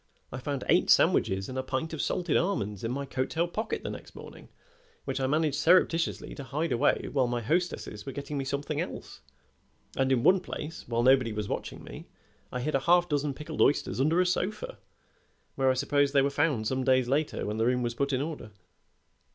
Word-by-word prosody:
I 130 - -5
found 140 +1 -3
eight - - +3
sandwiches 95 0 +3
and 130 0 -4
a - - +1
pint 130 +5 -3
of 160 - -2
salted 175 -4 -1
almonds 105 - -1
in 115 - -1
my 140 +2 -3
coat 130 -1 -2
tail 170 +2 0
pocket 215 +5 -3
the - - -4
next - - -10
morning, - - -12 0.6
which - - -2
I 130 - 0
managed 150 0 +1
surreptitiously 165 +1 +2
to 140 - -7
hide 150 +4 -2
away 120 - +2
while 130 -3 +2
my 120 0 -1
hostesses 155 - -2
were 135 - -6
getting 140 +2 -6
me - - -1
something 140 +1 -2
else, - - -7 0.7
and 135 0 +1
in 125 -3 +2
one 190 +1 +5
place, 165 -2 -7
while 120 0 0
nobody 130 -2 +4
was 105 -1 -3
watching - - -5
me, - - -10 0.4
I 125 - -3
hid 155 +4 -2
a 135 - +3
half 175 +5 +4
dozen 145 -2 -1
pickled 150 - -5
oysters 140 -2 +2
under 160 +5 +3
a 185 - +4
sofa, 210 - -2 0.7
where 135 -1 +2
I 130 - +3
suppose 145 +1 +1
they 140 -1 +5
were 140 - +1
found 145 -6 +1
some 130 +3 -1
days 130 -1 +3
later 145 +4 0
when 105 +1 -3
the 115 +1 +2
room 125 0 +1
was 120 0 -1
put 140 +4 -1
in 130 +1 0
order." 155 -8 -6
140 Hz, 210 wpm, -28 LUFS, 125-155 Hz, 0.7 s, one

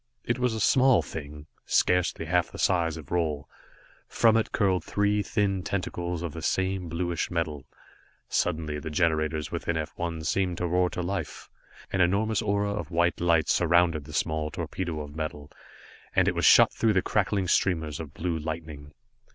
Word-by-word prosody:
It 120 +1 -1
was 125 -2 +1
a - - -3
small 130 +4 +4
thing, 75 -1 -8 0.2
scarcely 90 -2 +1
half 90 +1 +1
the - - -9
size 85 -3 +1
of 75 -4 -11
Roal. 80 -5 -1 0.6
From 115 -1 +4
it 115 - +1
curled 95 -5 +1
three 105 +2 +1
thin 100 -3 0
tentacles 90 -2 -3
of 85 -4 -4
the 80 - -7
same 95 +2 -1
bluish 85 +1 -2
metal. 80 -5 -3 0.6
Suddenly 80 -3 -1
the 80 - -6
generators 80 -2 0
within 85 - -2
F 80 -1 -4
1 85 -2 -3
seemed 90 +1 0
to 90 - -2
roar 90 +1 +2
into 90 - -4
life. 90 -4 -5 0.4
An 95 - +2
enormous 100 +5 +2
aura 100 -1 0
of 105 - -5
white 85 0 +1
light 85 -3 +3
surrounded 85 -4 +3
the 75 - -11
small 80 0 -1
torpedo 85 0 -4
of 75 0 -9
metal, 75 -2 -5 0.6
and - - +4
it - - +2
was - - 0
shot - - +7
through 110 -3 +1
with 95 - +3
crackling 100 -2 0
streamers 80 -5 +1
of 80 -3 -7
blue 85 -1 -2
lightning. 75 -2 -7
85 Hz, 175 wpm, -27 LUFS, 80-95 Hz, 0.6 s, shot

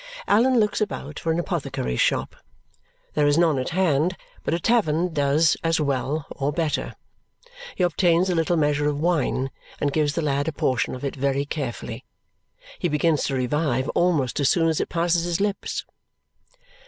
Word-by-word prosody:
Allan 245 +4 +4
looks 210 0 +1
about 150 -8 -3
for 165 - -1
an 165 - 0
apothecary's 160 - -2
shop. - - 0 0.8
There 150 -1 +2
is 145 +1 +3
none 165 -5 +3
at 130 - -2
hand, 175 -1 +1 0.3
but - - 0
a - - -2
tavern 175 -6 +1
does 150 +2 +3
as 165 0 +1
well 140 +1 -1
or 140 +1 -2
better. 155 -1 -2 0.8
He 185 - 0
obtains 175 +1 +3
a 185 - +1
little 165 +1 +1
measure 150 -1 +2
of 145 -1 -2
wine 150 -5 0 0.3
and 145 -1 0
gives 150 -2 +1
the 165 - -1
lad 145 0 0
a - - +1
portion 130 -4 0
of 130 - -6
it 140 - -3
very 140 +1 0
carefully. 140 -5 -5 0.8
He 175 - 0
begins 150 0 +1
to 135 - -1
revive 130 0 0
almost 155 -9 +1
as 140 - +3
soon 165 -2 +3
as 160 - 0
it - - -3
passes 170 0 +1
his 175 0 -1
lips. 205 0 -2
155 Hz, 175 wpm, -24 LUFS, 140-175 Hz, 0.8 s, Allan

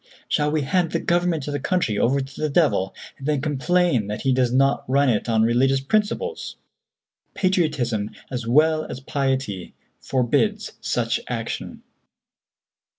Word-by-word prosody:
Shall 150 0 +1
we 150 -1 0
hand 170 +4 0
the - - +1
government 175 -4 0
of 145 - -3
the 145 - -1
country 135 - 0
over 135 +5 +2
to 135 +1 -8
the 155 - +1
devil, 140 - +2 0.2
and 135 - -6
then 150 -2 +1
complain 150 - +1
that 105 0 -4
he 135 - +3
does 125 -1 +2
not 135 +2 +2
run 140 +1 +3
it 115 0 0
on 110 -1 +3
religious 130 +4 +3
principles? 215 - -1 0.8
Patriotism 150 - 0 0.2
as 120 -3 -4
well 155 +5 +4
as - - -6
piety 130 -8 -2 0.2
forbids 150 - 0
such 115 -1 0
action. 115 -2 -5
135 Hz, 150 wpm, -23 LUFS, 120-160 Hz, 0.8 s, well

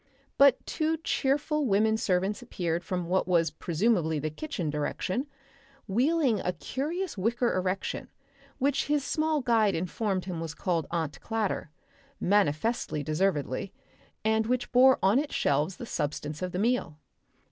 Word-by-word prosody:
But 275 -2 +6
two 320 +1 0
cheerful 295 -1 0
women 220 +1 +3
servants 195 0 0
appeared 175 -8 -2
from 180 0 -2
what 185 +2 +1
was 165 -3 +3
presumably 170 0 +1
the 155 +1 -2
kitchen 175 - -4
direction, 185 - -2 0.6
wheeling 255 +2 +2
a 180 - -1
curious 300 - -3
wicker 235 +4 +1
erection, 185 +1 -2 0.5
which 275 0 +1
his 295 -1 +1
small 310 0 0
guide 225 -5 +3
informed 185 +2 -2
him 180 -3 -4
was 160 -1 -5
called 170 -3 -1
Aunt 160 -3 -3
Clatter 220 -7 -2 0.5
manifestly 185 -2 +1
deservedly 155 0 -1 0.5
and 220 0 +2
which 250 +1 -1
bore 260 +1 +6
on 200 +7 +5
its 295 0 -3
shelves 150 +6 +1
the - - -6
substance 150 -4 -3
of 180 0 -2
the 180 - -3
meal. 210 -7 0
200 Hz, 140 wpm, -28 LUFS, 170-250 Hz, 0.6 s, But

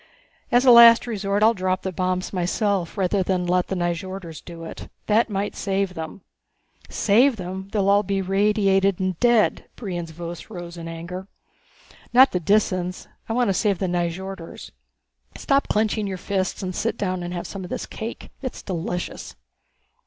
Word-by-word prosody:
As 245 +2 +4
a 250 - +8
last 235 -1 +9
resort 205 -3 -1
I'll 225 +1 +6
drop 185 -2 -1
the 190 - -2
bombs 185 +1 -2
myself 185 0 -1
rather 195 +1 +1
than 185 -1 0
let 180 0 +1
the 190 - -2
Nyjorders 175 -1 -4
do 170 -1 -9
it. 165 - -8 0.2
That 225 +2 +3
might 200 0 -2
save 195 -1 -1
them." 160 +3 -7 0.7
"Save 240 +6 +3
them 190 0 -6
they'd - - -2
all 200 +1 +4
be 195 -1 -1
radiated 195 0 +2
and 185 -3 -2
dead!" 240 -3 +3
Brion's 175 -7 -5
voice 170 +3 -8
rose 175 -4 -8
in 165 -1 -7
anger. 170 +3 -7 0.9
"Not 260 +2 +7
the 180 - 0
Disans. 185 -1 0 0.2
I - - 0
want 245 -2 +2
to - - +2
save 200 0 +1
the 190 - -2
Nyjorders. 175 0 -4 0.7
Stop 275 0 +1
clenching 215 0 0
your 190 -1 -4
fists 190 +1 -2
and 185 0 -3
sit 230 0 -1
down 185 -2 -2
and 175 0 -5
have 175 - -4
some 195 -2 -6
of 180 - -8
this - - -4
cake. 225 +2 -7
It's 260 -3 -6
delicious. 175 -1 -4
190 Hz, 170 wpm, -23 LUFS, 180-210 Hz, 0.9 s, last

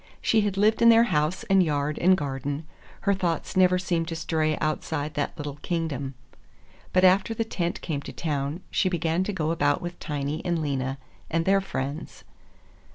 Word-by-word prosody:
She 220 - +3
had 205 -2 -1
lived 215 +3 +3
in 235 - +8
their 230 0 +7
house 155 +5 +1
and 195 -1 +4
yard 150 -2 0
and 185 +2 +5
garden; 145 +1 -3 0.4
her 200 - +2
thoughts 175 -4 -2
never 185 -1 +5
seemed 175 -3 -1
to 165 - -4
stray 155 -1 0
outside 155 0 -2
that 145 +3 -2
little 145 -2 -5
kingdom. 145 -6 -3 0.8
But 185 - +3
after 190 +4 +4
the 225 - 0
tent 175 -5 -3
came 145 -4 -3
to - - -8
town 150 +1 -3
she 185 - +2
began 170 0 0
to 210 - -1
go 160 -5 -1
about 145 -3 +2
with 175 0 -7
Tiny 150 +1 -3
and 170 -2 0
Lena 135 -3 -2 0.3
and 165 0 0
their 195 0 +4
friends. 140 -4 -5
165 Hz, 180 wpm, -26 LUFS, 145-185 Hz, 0.8 s, in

